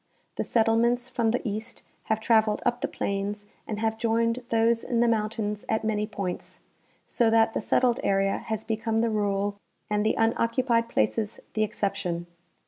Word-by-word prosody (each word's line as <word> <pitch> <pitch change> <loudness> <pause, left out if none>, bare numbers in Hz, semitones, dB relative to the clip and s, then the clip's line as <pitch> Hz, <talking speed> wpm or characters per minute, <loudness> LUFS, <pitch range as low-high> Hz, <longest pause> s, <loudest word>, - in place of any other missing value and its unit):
The - - -1
settlements 235 +2 +2
from 230 -2 +1
the 240 +1 -1
east 215 +1 -5 0.2
have 220 0 0
traveled 220 -1 +2
up 240 0 +1
the - - 0
plains 200 +1 -3 0.2
and 215 - -3
have 220 0 0
joined 230 +1 +1
those 230 0 +2
in 240 -2 -1
the 240 - +4
mountains 215 -2 -1
at 220 0 +1
many 215 -1 0
points, 200 -4 -5 0.5
so 235 -2 +2
that 225 0 +4
the - - -1
settled 240 +2 +2
area 195 0 +1
has 220 -1 -4
become 225 0 -1
the 230 -1 +1
rule 205 -1 0 0.3
and 210 0 +2
the 215 - +2
unoccupied 230 +1 +2
places 215 -2 0
the 215 - 0
excep 205 -1 0
tion. 175 -1 -3
220 Hz, 170 wpm, -27 LUFS, 210-230 Hz, 0.5 s, the